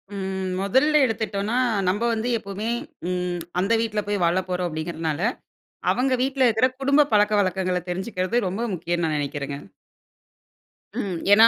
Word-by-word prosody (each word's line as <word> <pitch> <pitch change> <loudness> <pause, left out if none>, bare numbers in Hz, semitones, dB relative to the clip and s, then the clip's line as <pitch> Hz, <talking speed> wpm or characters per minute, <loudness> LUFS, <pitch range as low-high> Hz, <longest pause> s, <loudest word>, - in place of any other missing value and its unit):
ம். 190 -1 -3
முதல்ல 265 +10 +3
எடுத்துட்டோம்னா 220 -1 -1 0.3
நம்ம 205 +4 0
வந்து 225 +2 -1
எப்பமே 200 +2 -4 0.4
ம் 180 -1 -1 0.2
அந்த 200 +5 +2
வீட்ல 215 -2 -1
போய் 205 -2 0
வாழப் 180 +3 +1
போறோம் 180 0 0
அப்படிங்கிறனால, 160 -1 -3 0.7
அவங்க 260 +1 +1
வீட்ல 265 0 +2
இருக்கிற 230 +3 +3
குடும்ப 280 +2 +4
பழக்கவழக்கங்கள 190 -3 +2
தெரிஞ்சுக்கிறது 190 +4 -1
ரொம்ப 195 +6 -3
முக்கியம்னு 175 0 -1
நான் 155 -1 0
நினைக்கிறங்க. 140 0 -3 1.4
ம். 185 -4 -3 0.2
ஏன்னா, 220 +2 +9
195 Hz, 130 wpm, -24 LUFS, 180-225 Hz, 1.4 s, ஏன்னா